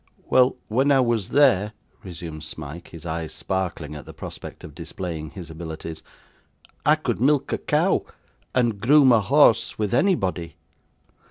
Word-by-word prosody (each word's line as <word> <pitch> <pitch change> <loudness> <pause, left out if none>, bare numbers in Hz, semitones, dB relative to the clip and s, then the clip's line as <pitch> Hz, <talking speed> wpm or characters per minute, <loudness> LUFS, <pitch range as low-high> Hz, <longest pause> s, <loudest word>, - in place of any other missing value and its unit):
'Well, 130 0 +5
when 135 +6 +2
I 135 - +5
was 120 -6 +1
there,' 110 -8 +4 0.3
resumed 85 -6 -8
Smike; 80 +2 -8
his 85 -1 -11
eyes 80 -1 -4
sparkling 90 -5 -3
at 75 -3 -9
the - - -11
prospect - - -9
of - - -10
displaying 80 -4 -6
his 85 -2 -9
abilities; 80 0 -7 0.9
'I - - +7
could - - -3
milk 140 +1 +2
a - - -1
cow, - - +1 0.5
and 115 -5 +1
groom 135 +1 +6
a 115 -2 +5
horse, 135 +1 +4
with 105 -1 -1
anybody. 95 - +1
95 Hz, 150 wpm, -24 LUFS, 80-125 Hz, 0.9 s, I